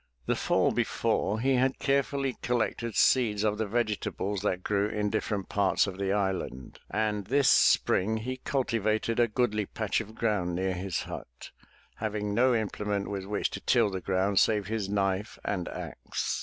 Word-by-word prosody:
The - - +1
fall - - +2
before 105 +4 0
he 135 +3 +2
had 130 +1 +2
carefully 140 -1 0
collected 115 -1 -1
seeds 110 -5 +3
of 105 0 0
the 110 - 0
vegetables 105 -3 -1
that 95 -3 -1
grew 100 0 +1
in 105 -1 -1
different 105 -3 -2
parts 100 -2 +2
of 95 -1 -6
the 95 -1 0
island, 95 -10 -2
and 105 -2 -1
this 140 +3 +3
spring 110 +4 +3
he 130 +4 -4
cul 135 +1 -1
tivated 110 0 0
a 120 - +5
goodly 105 -2 0
patch 110 0 -1
of 110 0 -10
ground 105 -7 0
near 95 +1 0
his 90 -1 -3
hut, - - -9 0.5
having 105 -1 -2
no 125 +4 +4
imple 105 -2 -2
ment 100 -1 -1
with 100 -2 -4
which 100 +1 -1
to - - -6
till 115 -5 +3
the 95 -1 -4
ground 95 +1 +1
save 105 -2 +2
his 105 -1 -2
knife 100 +1 -1
and 95 -4 -2
axe. - - -4
105 Hz, 175 wpm, -29 LUFS, 100-115 Hz, 0.5 s, a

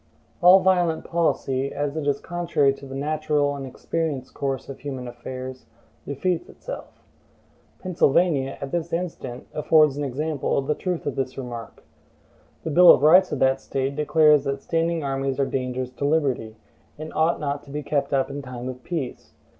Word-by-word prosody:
All 180 +2 +8
violent 175 -4 +2
policy, 140 -5 0
as 145 0 -2
it 155 -2 -3
is 140 -1 +1
contrary 170 -5 +1
to 140 0 -11
the 135 - -7
natural 150 0 0
and 135 -1 -6
experienced 145 0 -3
course 135 -2 -3
of 135 - -8
human 135 -3 -5
affairs, 130 +2 -8 0.4
defeats 165 +5 -1
itself. - - -9 0.7
Pennsylvania, 155 -5 +1
at 135 - -6
this 170 0 -2
instant, 165 -8 -4
affords 150 -2 +4
an 145 - -2
example 145 +2 -1
of 140 - 0
the 150 - +1
truth 180 +1 -3
of 145 - -2
this 130 -1 -3
remark. 120 -3 -7 0.8
The 160 - -3
Bill 175 +3 +7
of - - +4
Rights 180 +5 +6
of - - -1
that 130 0 +3
State 135 +1 -2
declares 150 -1 +4
that 140 0 -2
standing 165 -1 0
armies 135 0 -2
are 140 - +3
dangerous 130 -1 -3
to 140 - -4
liberty, 135 -7 0 0.4
and 155 +1 -7
ought 160 +2 +2
not 145 -1 -2
to - - -15
be 150 +1 -4
kept 140 -1 -1
up 135 0 +1
in 140 +1 -5
time 125 -1 -6
of 125 0 -8
peace. 160 -8 -5
140 Hz, 175 wpm, -24 LUFS, 135-160 Hz, 0.8 s, All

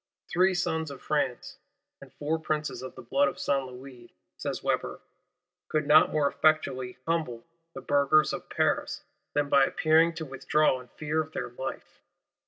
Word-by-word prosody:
"Three 185 +1 +3
Sons 160 -3 -1
of 140 - -8
France, 140 -5 -2 0.4
and - - -13
four 155 +2 -1
Princes 155 -1 -2
of 130 - -8
the 130 - -10
blood 135 +4 +2
of - - -4
Saint 135 -2 0
Louis," 125 -1 -12 0.2
says - - -4
Weber, - - -1 0.7
"could 155 -1 0
not 155 +2 +6
more 150 -2 +2
effectually 135 -5 +1
humble 155 -9 -2 0.3
the - - -6
Burghers 145 +2 +3
of - - -6
Paris - - 0 0.3
than 145 -1 +2
by 140 -1 +5
appearing 160 +4 +3
to 160 - -5
withdraw 135 0 +1
in 125 - -15
fear 150 +1 0
of 155 0 -8
their - - -4
life." 130 +2 -7
145 Hz, 165 wpm, -28 LUFS, 130-155 Hz, 0.7 s, not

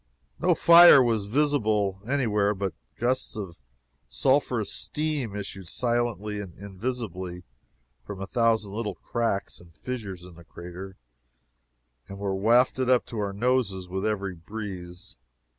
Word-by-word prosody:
No - - +3
fire 170 -3 +9
was 115 -4 0
visible 110 -7 +1
any 140 0 +1
where, 105 -1 +1
but 95 -2 -3 0.2
gusts 130 +2 -1
of 95 -5 -7 0.5
sulphurous 115 - +1
steam 150 -8 -2
issued 95 -2 -6
silently 120 -2 -1
and 95 -4 -8
invisibly 95 -3 -5 0.6
from 100 -2 -8
a 95 - -4
thousand 110 -3 +1
little 105 -3 -3
cracks 115 -1 -2
and 85 -2 -18
fissures 100 -6 -6
in 90 - -13
the 85 +1 -14
crater, 90 +3 -10 1.1
and 100 - -9
were 100 -1 -2
wafted 120 +6 +3 0.2
to 115 - -6
our 100 -1 -1
noses 100 -4 0
with 95 +2 -4
every 100 -3 -1
breeze. 90 - -8
105 Hz, 130 wpm, -26 LUFS, 95-120 Hz, 1.1 s, fire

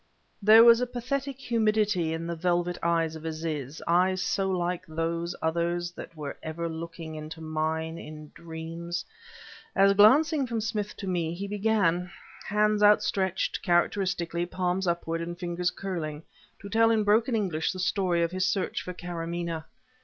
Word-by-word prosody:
There 215 +3 +8
was 235 0 +7
a 250 - 0
pathetic 265 +3 -3
humidity 215 -8 +1
in 165 +1 -3
the 170 0 -3
velvet 175 +1 0
eyes 165 -1 +1
of 160 - -9
Aziz 155 -3 -4
eyes 185 +2 +3
so 190 +1 0
like 180 -1 -1
those 165 +2 -2
others 170 +2 0
that 165 -2 -10
were 145 -2 -6
ever 165 +2 -4
looking 165 0 -7
into 155 +1 -7
mine 160 +1 -2
in 150 -1 -10
dreams 170 +1 -6 0.7
as 195 +1 +5
glancing 270 +8 +5
from 230 -1 -2
Smith 210 -1 -3
to - - -6
me 170 -2 -1
he 200 +3 -5
began, 200 -4 +1 0.4
hands 210 0 +2
outstretched, 205 -3 +2
characteristically, 175 -1 +1
palms 180 +1 -1
upward 165 -1 -1
and 175 +1 -5
fingers 175 0 -1
curling, 160 -7 -5 0.4
to - - -6
tell 225 +1 +4
in 220 -2 +3
broken 225 +4 +3
English 180 -7 0
the 185 - -7
story 185 -2 +1
of 170 - -1
his 185 0 0
search 190 0 -1
for 180 - -6
Karamaneh... 170 -2 -4
175 Hz, 155 wpm, -28 LUFS, 165-205 Hz, 0.7 s, There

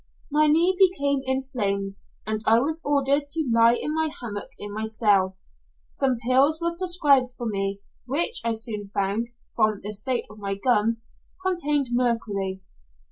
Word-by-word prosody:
My 305 +1 +4
knee 335 +5 +3
became 285 -8 +3
inflamed, 210 -7 -2 0.3
and 215 0 -2
I 225 +1 +6
was 310 +6 0
ordered 285 0 +1
to 310 -2 0
lie 230 +1 +5
in 300 - -2
my 320 0 +1
hammock 210 -4 -6
in 205 0 -7
my 215 +1 -3
cell. 205 -4 +2 0.5
Some 265 -3 0
pills 260 +7 +3
were 340 0 -2
prescribed 295 -8 +3
for 240 - -5
me, 195 -2 -2 0.3
which 330 - +2
I 230 0 0
soon 220 -2 -3
found, 200 +3 -1 0.3
from 215 -2 +1
the 210 +1 -4
state 235 +5 -1
of 210 - -14
my 200 -1 -2
gums, 230 +1 +1 0.4
contained 295 -7 0
mercury. 210 -6 -1
240 Hz, 155 wpm, -24 LUFS, 210-285 Hz, 0.5 s, I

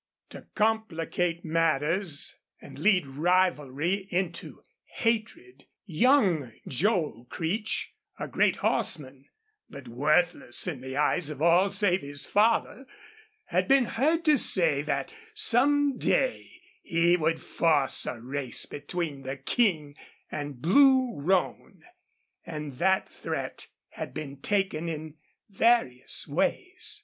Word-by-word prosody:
To - - -11
complicate 180 -6 -1
matters 165 +1 0 0.2
and 135 -1 -12
lead 185 -1 +3
rivalry 170 +3 0
into 175 -1 -4 0.3
hatred 235 - -2 0.2
young 180 - +2
Joel 155 - -1
Creech, 195 +6 -3 0.2
a - - -5
great - - +2
horseman, 135 -2 -2 0.4
but 140 -1 -11
worthless 150 +1 +1
in 150 -8 -4
the 130 +1 -6
eyes 150 +2 +1
of 150 -3 -7
all 170 +5 +4
save 190 -2 +1
his 145 0 -6
father, 230 +5 +1 0.6
had - - 0
been 270 -2 +4
heard 315 +9 0
to 305 -2 +5
say 160 -10 +2
that 155 - -3 0.2
some 290 - +4
day - - 0 0.3
he 170 +1 +2
would 165 -1 0
force 150 -5 +1
a 120 - -4
race 130 +1 -1
between 145 -1 -5
the 135 +1 -5
King 150 - 0 0.4
and 145 -4 -6
Blue 260 - +5
Roan. 185 +4 -1 0.6
And 150 -5 -7
that 190 0 +2
threat - - -6 0.2
had - - -8
been 140 -2 -6
taken 185 0 -1
in 155 -1 -7 0.3
various 200 - +1
ways. - - -1
170 Hz, 115 wpm, -27 LUFS, 145-210 Hz, 0.6 s, to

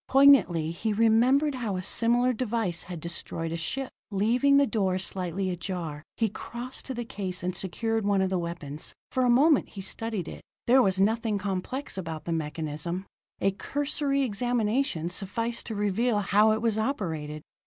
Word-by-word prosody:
Poignantly 260 - +5
he 210 +6 -2
remembered 240 +7 +4
how 230 -6 -2
a 185 - -3
similar 240 +5 +3
device 220 -7 -1
had 175 -2 -7
destroyed 165 0 -4
a - - -2
ship. 265 +11 -3 0.2
Leaving 240 +7 +3
the 280 - +5
door 195 -7 0
slightly 185 0 -2
ajar, 170 -4 -4 0.2
he 225 - +2
crossed 240 +5 -6
to 265 - -4
the 240 0 -4
case 185 -4 -4
and 180 0 -2
secured 225 +5 -1
one 200 -1 +2
of 190 0 +1
the 185 - +1
weapons. 165 -3 -5 0.2
For 255 - +1
a 250 - +3
moment 280 +4 +4
he 195 - -8
studied 210 -2 -3
it. - - -8 0.2
There 260 +2 +6
was 190 -5 +2
nothing 220 +1 +2
complex 200 +5 -3
about 160 -3 -5
the 170 - -3
mechanism; 160 +3 -3 0.3
a 195 - +2
cursory 280 +5 -1
examination 235 - 0
sufficed 230 +5 -2
to 220 - -4
reveal 210 +3 +1
how 210 +2 +4
it 220 +1 0
was 220 -2 +1
operated. 160 - -3
205 Hz, 170 wpm, -27 LUFS, 180-240 Hz, 0.3 s, There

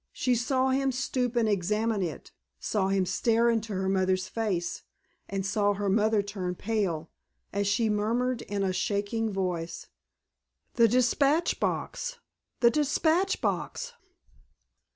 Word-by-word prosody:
She 250 - +1
saw 255 +2 +1
him 270 +1 +1
stoop 255 -1 -1
and 235 -2 +3
examine 210 +2 0
it, 175 -3 -5 0.3
saw 200 -3 0
him 195 -1 +1
stare 230 +5 +2
into 220 -2 -2
her 190 0 -1
mother's 185 -1 +1
face, 185 -6 -2 0.5
and 195 -1 -2
saw 205 +1 +1
her 200 0 -1
mother 215 +1 +3
turn 190 -3 -4
pale, 185 -7 -2 0.4
as 200 0 0
she 220 +3 +2
murmured 230 +4 0
in 200 -1 -3
a 190 -1 0
shaking 210 +2 -1
voice, 180 -4 -3 0.8
"The 235 -1 +5
dispatch 275 +7 +2
box—the 475 - -2
dispatch 315 +6 +1
box!" - - -2
215 Hz, 130 wpm, -28 LUFS, 195-245 Hz, 0.8 s, The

